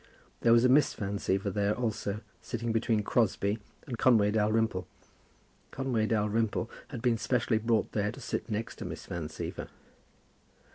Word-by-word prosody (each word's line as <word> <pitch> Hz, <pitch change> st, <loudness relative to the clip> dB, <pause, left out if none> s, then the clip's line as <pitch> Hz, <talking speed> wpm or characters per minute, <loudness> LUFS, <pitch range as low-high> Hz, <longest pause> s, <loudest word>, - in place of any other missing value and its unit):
There 115 Hz, -, +4 dB
was 115 Hz, +1 st, +6 dB
a -, -, +7 dB
Miss 140 Hz, +4 st, +4 dB
Van 100 Hz, 0 st, -3 dB
Siever 100 Hz, +1 st, 0 dB
there 100 Hz, +1 st, +1 dB
also, 110 Hz, -3 st, -2 dB, 0.2 s
sitting 115 Hz, -1 st, -3 dB
between 110 Hz, -1 st, +1 dB
Crosbie 105 Hz, -1 st, +1 dB, 0.3 s
and 120 Hz, -5 st, -5 dB
Conway 110 Hz, -5 st, +5 dB
Dalrymple. 110 Hz, -3 st, +1 dB, 0.8 s
Conway 125 Hz, -5 st, 0 dB
Dalrymple 110 Hz, +1 st, 0 dB, 0.2 s
had 125 Hz, -5 st, -7 dB
been 120 Hz, -3 st, +2 dB
specially 115 Hz, -1 st, +1 dB
brought 115 Hz, 0 st, +1 dB
there 105 Hz, -1 st, 0 dB
to -, -, -11 dB
sit -, -, -4 dB
next 110 Hz, +1 st, -3 dB
to -, -, -6 dB
Miss -, -, -6 dB
Van 85 Hz, -3 st, -4 dB
Siever. 80 Hz, -, -5 dB
110 Hz, 155 wpm, -30 LUFS, 105-115 Hz, 0.8 s, a